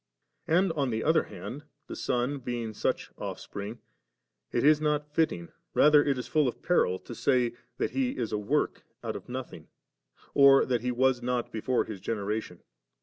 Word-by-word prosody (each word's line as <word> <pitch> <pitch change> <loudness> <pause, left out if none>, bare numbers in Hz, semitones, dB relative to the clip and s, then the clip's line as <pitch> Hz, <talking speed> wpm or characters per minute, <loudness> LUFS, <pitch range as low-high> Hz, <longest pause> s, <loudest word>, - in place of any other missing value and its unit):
And 180 +3 +3
on 145 -5 0
the 110 -1 -1
other 160 0 +3
hand, 145 +4 -8 0.2
the - - -7
Son 125 +3 -1
being 120 -3 -4
such - - -2
Ofifspring, 100 +4 -6 0.7
it - - 0
is 150 +1 +5
not 150 -1 0
fitting, 155 - 0 0.3
rather 150 0 +6
it 140 -2 +1
is 125 - -4
full 150 +2 +2
of 120 - -4
peril, 95 - +2
to 120 - -10
say, 125 -1 +2 0.2
that - - -1
He 260 -1 -1
is 115 -3 -2
a - - +1
woik 105 - 0 0.2
out - - -3
of - - -8
nothing, - - -6 0.7
or 140 -1 +7
that 125 -3 0
He 125 +1 -1
was 130 0 +2
not 125 0 -1
before 120 +3 0
His 105 -3 -7
generation. 105 -3 -3
125 Hz, 175 wpm, -29 LUFS, 115-150 Hz, 0.7 s, or